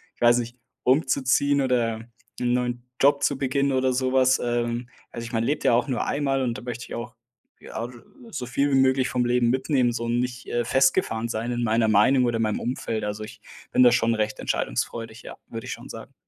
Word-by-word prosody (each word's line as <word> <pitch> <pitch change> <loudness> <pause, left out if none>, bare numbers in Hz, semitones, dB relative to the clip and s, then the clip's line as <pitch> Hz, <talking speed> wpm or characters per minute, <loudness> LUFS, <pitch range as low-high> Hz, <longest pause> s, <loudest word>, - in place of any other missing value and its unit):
ich - - -33
weiß 120 0 +5
nicht- 120 +1 -6 0.3
umzuziehen 140 +1 +2
oder 120 -4 0 0.4
'n 120 0 +1
neuen 125 -1 -1 0.2
Job 140 +1 +4
zu 140 - +1
beginnen 140 +1 0
oder 130 -1 +1
sowas. 130 0 +3
Ähm, 120 0 -2 0.2
also 115 - -6
ich 115 - -8
man 115 -1 0
lebt 145 +5 -1
ja - - +4
auch 120 +4 +2
nur 125 -3 -1
einmal 135 -2 0
und 120 -2 -1
da - - -8
möchte 120 -1 -6
ich - - -7
auch, 120 +1 -7 0.5
ja, 110 - -7
od 120 +1 -7 0.4
so 125 -7 -4
viel 140 +3 0
wie - - +3
möglich 130 0 +3
vom 125 -1 0
Leben 120 -1 +2
mitnehmen, 130 -1 +1
so 115 - -3
und 120 +1 0
nicht, 125 0 -4
äh, 120 0 -1
festgefahren 120 -3 +2
sein 115 +2 -2
in 120 0 -1
meiner 115 0 +2
Meinung 125 +5 +4
oder 120 -1 0
in 115 - 0
meinem 105 -1 -1
Umfeld. 115 -3 -3
Also, 105 +1 -4
ich 110 0 -10 0.3
bin 125 - +5
da 120 - +7
schon 115 -1 +2
recht 110 -1 -2
entscheidungsfreudig, 115 0 -3
ja, - - -9
würde 115 -1 -7
ich - - -5
schon - - -10
sagen. - - -10
120 Hz, 220 wpm, -25 LUFS, 115-130 Hz, 0.5 s, da